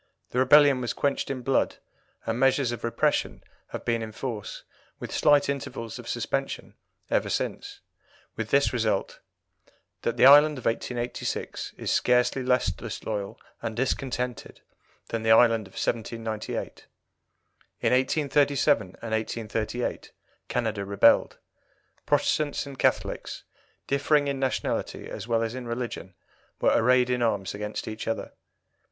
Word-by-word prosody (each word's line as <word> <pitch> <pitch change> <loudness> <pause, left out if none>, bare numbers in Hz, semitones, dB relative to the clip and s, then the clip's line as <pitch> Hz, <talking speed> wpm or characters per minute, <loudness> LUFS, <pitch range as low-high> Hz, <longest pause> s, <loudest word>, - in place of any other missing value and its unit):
The 125 - 0
rebellion 140 0 +6
was 120 - -2
quenched 140 -1 -1
in 130 -2 -4
blood, 135 +2 +1 0.5
and 115 +1 -2
measures 135 -1 +3
of 120 -1 -6
repression 115 - 0 0.2
have - - -7
been 115 -1 +1
in 110 -1 -5
force, 110 -2 -6 0.3
with - - -7
slight 145 -2 +4
intervals 115 -5 -4
of - - -9
suspension, - - -3 0.4
ever - - +1
since, - - -3 0.5
with 110 -1 -4
this 140 -4 +3
result 110 -5 -1 0.8
that 120 +1 -2
the - - +6
Ireland 145 +2 +8
of 125 - -9
1886 120 +1 -3
is - - -3
scarcely 125 +1 +2
less 125 -5 +2
disloyal 100 +3 -5 0.2
and 110 - -4
discontented 125 -1 -3 0.5
than 115 - -2
the 110 - -1
Ireland 115 -2 +5
of 95 - -20
1798. 115 -1 -4 0.9
In - - +2
1837 140 +1 +2 0.2
and 115 - -5
1838 110 +1 -3 0.4
Canada 110 -4 -1
rebelled. 100 0 +4 0.7
Protestants 145 0 +1
and 140 -2 -10
Catholics, - - -1 0.4
differing 145 +1 +2
in 140 -1 -2
nationality 135 -1 -2
as - - -7
well 115 -1 +1
as 115 0 -3
in 125 -1 -6
religion, 115 -6 -5 0.4
were - - +3
arrayed 125 +1 +4
in 125 -1 0
arms 105 -5 0
against 105 +1 -5
each 110 +1 -6
other. 115 - -3
120 Hz, 135 wpm, -26 LUFS, 110-135 Hz, 0.9 s, Ireland